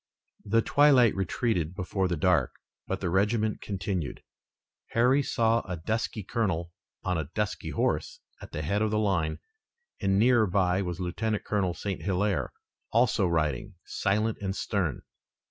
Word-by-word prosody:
The 115 +2 +2
twilight 140 -6 +5
retreated 95 -2 -1
before 95 0 -1
the 85 -2 -1
dark, 90 +2 +2 0.3
but 95 - -3
the 90 - -1
regiment 105 +3 +1
continued. 95 -6 -3 0.7
Harry 125 +4 +4
saw 115 -3 +2
a 90 -5 -5
dusky 110 +4 -2
colonel 90 -6 -1 0.3
on 90 -3 0
a 75 -2 -4
dusky 105 -2 -2
horse - - -1 0.2
at - - -10
the 75 - -4
head 100 +7 0
of 110 - +2
the 105 - 0
line, 95 -7 +1 0.6
and 95 -1 +2
nearer 115 0 +4
by 90 0 +2
was 90 -1 -4
Lieutenant 105 +4 -2
Colonel 95 -4 0
St. 100 -2 -4
Hilaire, 100 0 0 0.4
also 115 -4 +3
riding, 80 - -1
silent 105 +3 0
and 95 -1 -2
stern. 90 - -1
100 Hz, 145 wpm, -28 LUFS, 90-110 Hz, 0.7 s, twilight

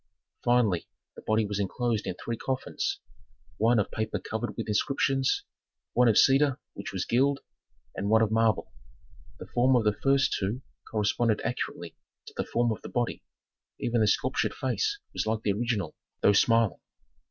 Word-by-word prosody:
Finally 120 -8 +2 0.3
the - - -10
body 110 0 +1
was 100 0 -3
inclosed 110 +3 -1
in 90 - -2
three 115 +5 -4
coffins: 130 +3 -2 0.6
one 115 +3 +3
of 105 - 0
paper 110 0 -2
covered 110 +2 -4
with 115 - -3
inscriptions, 135 +4 +1 0.5
one 125 0 +4
of 110 - +4
cedar 135 0 +4
which 100 - -7
was 95 -1 -2
gilt, 135 +3 +2 0.5
and 100 +2 -2
one 110 +1 +5
of 110 - 0
marble. 110 -2 +2 0.7
The - - -8
form 125 +2 +2
of 120 - +3
the 105 -1 +3
first 135 +5 +2
two 105 +7 -2 0.3
corresponded 110 +1 +1
accurately 85 -8 -4 0.3
to - - -12
the - - -1
form 120 0 +1
of 110 - -4
the - - -8
body; 120 -1 -2 0.6
even 120 -1 +1
the 105 - +4
sculptured 100 - +1
face 130 - -1 0.2
was - - -2
like 110 0 -1
the 100 - +2
original, 105 -6 -2 0.3
though 100 - +5
smiling. 115 0 +3
115 Hz, 165 wpm, -28 LUFS, 105-125 Hz, 0.7 s, one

